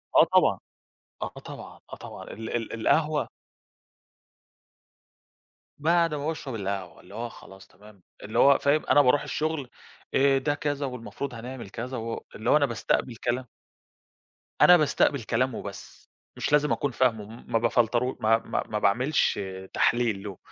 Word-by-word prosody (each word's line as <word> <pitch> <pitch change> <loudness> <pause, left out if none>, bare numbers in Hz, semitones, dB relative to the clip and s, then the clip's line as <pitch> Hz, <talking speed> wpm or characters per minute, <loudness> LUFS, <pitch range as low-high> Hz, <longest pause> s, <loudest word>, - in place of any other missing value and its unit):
آه - - +9
طبعًا، - - +3 0.6
آه - - -2 0.2
طبعًا، - - -10
آه - - -3
طبعًا - - -10
ال 110 +1 -8
ال 115 -1 -3
القهوة 150 +6 +1 2.5
بعد 165 +1 +2
ما 145 -1 -3
باشرب 145 -6 -4
القهوة، 95 -4 -4
اللي 100 +3 -14
هو 120 +1 -4
خلاص 95 -3 -14
تمام، 105 -2 -18 0.2
اللي 105 - -2
هو 140 0 +7
فاهم 145 +2 +1
أنا 145 - +5
باروح 145 +2 +3
الشغل، 150 -3 -2 0.4
آآ، 135 0 +4
ده 145 +2 0
كذا 145 -1 -2
والمفروض 125 +1 -6
هنعمل 120 -2 -7
كذا 125 +4 -5
و 115 0 -5
اللي 110 - -3
هو 150 - +6
أنا 145 - +3
باستقبل 115 +1 -1
كلام 125 +2 -2 1.2
أنا 180 0 +9
باستقبل 140 -4 +2
كلام 125 +2 0
وبس، 100 -1 -9 0.3
مش - - -2
لازم 150 0 +3
أكون 140 - 0
فاهمه، 115 -4 +1 0.2
ما 115 - +1
بافلترو 120 +2 +1
ما 110 +1 +4
ما - - -3
ما 105 - -2
باعملش 125 +6 +2 0.3
تحليل 115 -4 +1
له، 100 -3 -7
125 Hz, 150 wpm, -26 LUFS, 110-145 Hz, 2.5 s, آه